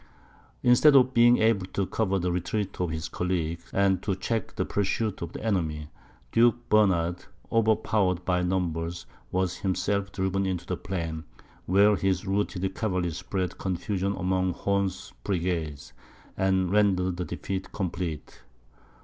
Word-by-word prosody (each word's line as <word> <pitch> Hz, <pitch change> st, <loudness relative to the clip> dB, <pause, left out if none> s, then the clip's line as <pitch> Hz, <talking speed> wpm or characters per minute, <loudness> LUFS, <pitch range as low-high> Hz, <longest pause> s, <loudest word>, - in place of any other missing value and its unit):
Instead 125 Hz, +4 st, +6 dB
of 130 Hz, -1 st, +5 dB
being 120 Hz, +1 st, +6 dB
able 110 Hz, -4 st, +2 dB
to 100 Hz, 0 st, -1 dB
cover 100 Hz, -1 st, 0 dB
the 90 Hz, -1 st, -1 dB
retreat 90 Hz, +3 st, -2 dB
of 90 Hz, -, 0 dB
his 80 Hz, 0 st, -3 dB
colleague, 85 Hz, -2 st, -2 dB
and 95 Hz, -2 st, +2 dB
to 95 Hz, -2 st, -1 dB
check 110 Hz, +3 st, -3 dB
the -, -, -1 dB
pursuit 100 Hz, +1 st, -1 dB
of 85 Hz, -1 st, -4 dB
the -, -, -8 dB
enemy, 80 Hz, -8 st, -1 dB, 0.4 s
Duke 120 Hz, +1 st, +3 dB
Bernard, 90 Hz, -5 st, +2 dB, 0.3 s
overpowered 105 Hz, -5 st, +2 dB
by 90 Hz, -1 st, +1 dB
numbers, 85 Hz, -3 st, -2 dB, 0.3 s
was 90 Hz, -1 st, 0 dB
himself 100 Hz, +1 st, -1 dB
driven 95 Hz, 0 st, -1 dB
into 90 Hz, -2 st, -3 dB
the -, -, -2 dB
plain, 85 Hz, -4 st, -4 dB, 0.4 s
where 100 Hz, +3 st, +5 dB
his 95 Hz, -1 st, 0 dB
routed 95 Hz, -1 st, -1 dB
cavalry 90 Hz, -6 st, -1 dB
spread 90 Hz, +2 st, -3 dB
confusion 95 Hz, +1 st, -2 dB
among 95 Hz, 0 st, 0 dB
Horn's 100 Hz, -1 st, -1 dB
brigade, 85 Hz, -7 st, -2 dB, 0.5 s
and 95 Hz, -1 st, +1 dB
rendered 95 Hz, -3 st, +2 dB
the 90 Hz, -, -2 dB
defeat 95 Hz, +1 st, -5 dB
complete. 85 Hz, -5 st, -4 dB
95 Hz, 140 wpm, -27 LUFS, 90-100 Hz, 0.5 s, Instead